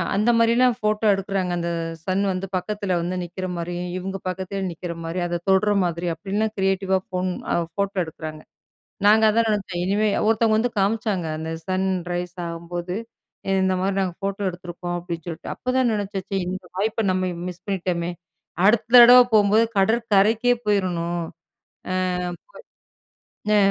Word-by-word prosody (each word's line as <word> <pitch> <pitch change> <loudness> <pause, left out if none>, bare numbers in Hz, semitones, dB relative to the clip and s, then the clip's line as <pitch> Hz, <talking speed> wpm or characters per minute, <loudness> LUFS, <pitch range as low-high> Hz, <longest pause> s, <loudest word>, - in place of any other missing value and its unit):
அந்த 215 +4 +2
மாரிலாம் 235 +1 +4
போட்டோ 215 +1 +1
எடுக்குறாங்க. 195 -2 -2
அந்த 170 0 -2 0.4
சன் 190 +1 +1
வந்து 185 +1 -3
பக்கத்துல 195 0 -2
வந்து 175 +2 -2
நிக்கிற 180 +2 -5
மாரியும், 175 +1 -4
இவுங்க 190 +1 -4
பக்கத்துல 190 +2 -3
நிக்கிற 170 0 -6
மாரி, 165 +2 -3
அத 175 0 -2
தொடுற 195 +2 +4
மாதிரி 175 0 -2
அப்டிலாம் 205 +6 -2
கிரியேட்டிவ் 190 0 0
வா 190 - +4
போன் 185 0 0 0.2
அ, - - +2 0.2
போட்டோ 200 0 -1
எடுக்குறாங்க. 155 -1 -8 0.6
நாங்க 215 +2 +6
அதான் 225 +1 +2
நெனச்சோம் 195 -4 -2
இனிமே 205 +3 +2 0.2
ஒருத்தவங்க 225 0 +3
வந்து 235 +2 0
காமிச்சாங்க. 200 -2 0
அந்த 160 +1 -5 0.2
சன் 190 0 0 0.2
ரைஸ் 175 0 -4
ஆகும்போது, 170 +1 -5 0.7
இந்த 190 0 +2
மாரி 195 +1 0
நாங்க 185 -3 -2
போட்டோ 195 +1 -2
எடுத்திருக்கோம் 175 0 -6
அப்டின் 170 -2 -6
சொல்லிட்டு. 170 -2 -6
அப்தான் 255 -1 +1
நெனச்சாச்சோம், 195 -2 -3
இந்த 185 0 -5
வாய்ப்ப 220 +3 0
நம்ம 185 0 0 0.2
மிஸ் 180 0 -11
பண்ணிட்டோமே. 180 -3 -2 0.5
அடுத்த 215 +2 +4 0.2
தடவ 245 +1 +10
போவும்போது 215 +1 +5
கடற் 225 +4 +2
கரைக்கே 225 +5 +4
போயிறணும். 175 -4 0
அ, - - -11 2.2
புகை 210 - +4
ஆ, - - +5
190 Hz, 150 wpm, -23 LUFS, 175-210 Hz, 2.2 s, தடவ